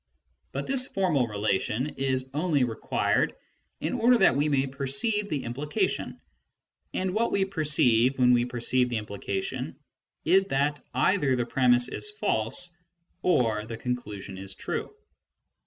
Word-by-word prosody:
But - - -3
this 265 -1 +1
formal 165 -11 +1
relation 105 +5 -1
is 130 -1 0
only 150 -2 +1
required 115 -3 0 0.4
in - - -2
order 245 +2 +4
that 195 - +4
we 145 +2 +1
may 140 -2 +2
perceive 140 - -1
the 145 -5 -2
implication, 140 +6 -2 0.7
and 185 0 -2
what 230 +3 +1
we 195 -1 +2
perceive 140 -8 +3
when 125 -1 +5
we 120 0 +3
perceive 125 +1 +1
the 120 - -1
implication 100 -2 -4 0.5
is 190 +4 +5
that 145 -2 0
either 135 0 +2
the 120 -1 0
premiss 125 0 +3
is 420 - -5
false 180 - -1 0.5
or 110 -11 +1
the 115 -1 -6
conclusion 110 -6 -5
is 95 0 -4
true. - - -4
135 Hz, 140 wpm, -27 LUFS, 120-175 Hz, 0.7 s, when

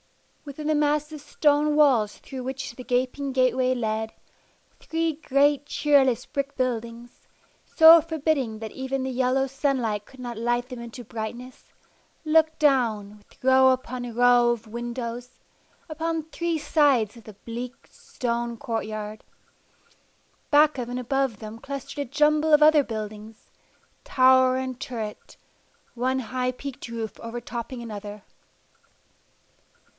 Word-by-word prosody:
Within 290 +1 -8
the 310 - +2
massive 300 0 0
stone 295 0 +2
walls 250 -9 +3
through 260 -2 -8
which 265 -1 -5
the 255 - -9
gaping 255 +3 -1
gateway 255 0 +2
led, 220 -2 -2 0.7
three 325 0 -1
great 290 -1 +1
cheerless 275 -7 +2
brick 280 0 -4
buildings, 235 -1 -4 0.4
so 325 0 +8
forbidding 305 -7 -1
that 220 -1 -6
even 265 0 -3
the 260 - -3
yellow 260 +1 +1
sunlight 255 -6 -1
could 265 - -18
not 240 -2 -6
light 240 +2 -1
them 250 -2 -7
into 235 +1 -9
brightness, 235 +3 -8 0.5
looked 315 0 +3
down, 225 -8 +1
with 205 - -26
row 260 0 +6
upon 255 -1 -2
row 245 0 +5
of 235 -1 -2
windows, 240 +1 -6 0.5
upon 325 0 -3
three 335 +1 -2
sides 285 -8 +2
of 230 - -15
the 215 - -11
bleak, 240 +2 -7
stone 235 -1 -4
courtyard. 215 -2 -5 1.3
Back 295 -1 +4
of 240 -1 -4
and 245 +1 -3
above 265 -2 -1
them 215 +1 -9
clustered 275 +2 -7
a 285 -4 -3
jumble 300 +2 +2
of 300 0 +7
other 305 -1 +6
buildings, 215 -1 -8 0.5
tower 260 0 +4
and 260 -1 -4
turret, 220 -4 -6 0.6
one 255 +2 0
high 255 +1 -2
peaked 260 0 -8
roof 230 -3 -6
overtopping 235 +1 -6
another. 210 -2 -8
255 Hz, 130 wpm, -25 LUFS, 235-285 Hz, 1.3 s, so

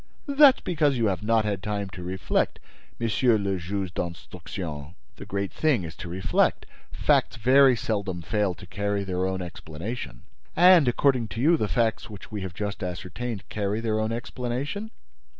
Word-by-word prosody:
"That 280 -2 +7
is - - -15
because 150 -6 +1
you 115 - +1
have 95 -4 0
not 110 0 +2
had 100 -3 -2
time 100 0 -2
to 90 0 -9
reflect, 90 +1 -1 0.4
Monsieur 115 +1 +2
le 100 -2 -1
Juge 95 +1 -3
d'Instruction. 85 -2 -6 0.2
The - - -10
great 100 -3 -3
thing 145 - +2
is 80 -1 -7
to 85 - -7
reflect. 90 +2 +1 0.3
Facts - - +2
very 130 +3 +5
seldom 100 -6 -3
fail 105 -1 0
to - - -12
carry 100 +2 -2
their 95 -1 -1
own 95 -1 -2
explanation!" 85 - -7 0.3
"And, 175 -4 +7
according 125 -1 +2
to 115 - -6
you, 160 +7 +5
the 110 -9 0
facts 115 0 0
which 105 0 -11
we 105 -2 -4
have 95 -3 -6
just 105 +1 -4
ascertained 95 +4 -5
carry 105 0 -2
their 110 -1 0
own 110 +1 -1
explanation?" 125 - -4
105 Hz, 170 wpm, -26 LUFS, 95-120 Hz, 0.4 s, That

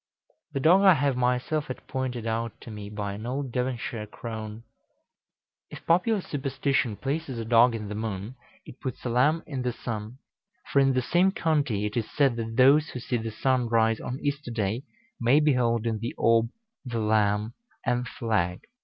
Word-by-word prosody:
The 135 - -1
dog 175 +7 +6
I 190 -3 +7
have 140 -2 +1
myself 125 +5 0
had 130 - -7
pointed 125 -3 -3
out 115 0 -2
to 115 - -9
me 105 -1 -7
by 105 -1 -4
an 110 +3 -6
old 135 +1 -3
Devonshire 120 -3 -3
crone. 110 0 -7 1.1
If - - -11
popular 185 +5 +3
superstition 135 -5 -1
places 140 +1 -3
a 115 - -4
dog 115 +1 +5
in 110 -2 -5
the 105 - -5
moon, 105 +1 -4 0.3
it 125 - -12
puts 130 -2 -6
a - - 0
lamb 145 +7 +3
in 135 -4 -4
the 125 0 0
sun; 115 0 -6 0.6
for 140 - +5
in 135 -1 +4
the 130 -1 +1
same 180 +7 +3
county 145 - 0
it 105 - -3
is 115 -3 -1
said 140 -4 +2
that 115 -1 -4
those 140 +4 +6
who 125 - -6
see 120 +1 -1
the 115 0 -4
sun 125 +3 +1
rise 115 -1 +3
on 125 - -4
Easter 145 -2 -2
day, 115 +2 -2 0.3
may 120 +5 +4
behold 120 -6 +2
in 110 -2 -1
the 115 +3 -4
orb 115 0 +3 0.3
the 120 -3 -4
lamb 105 0 +1 0.3
and 125 0 0
flag. 95 -8 -1
120 Hz, 185 wpm, -27 LUFS, 110-135 Hz, 1.1 s, I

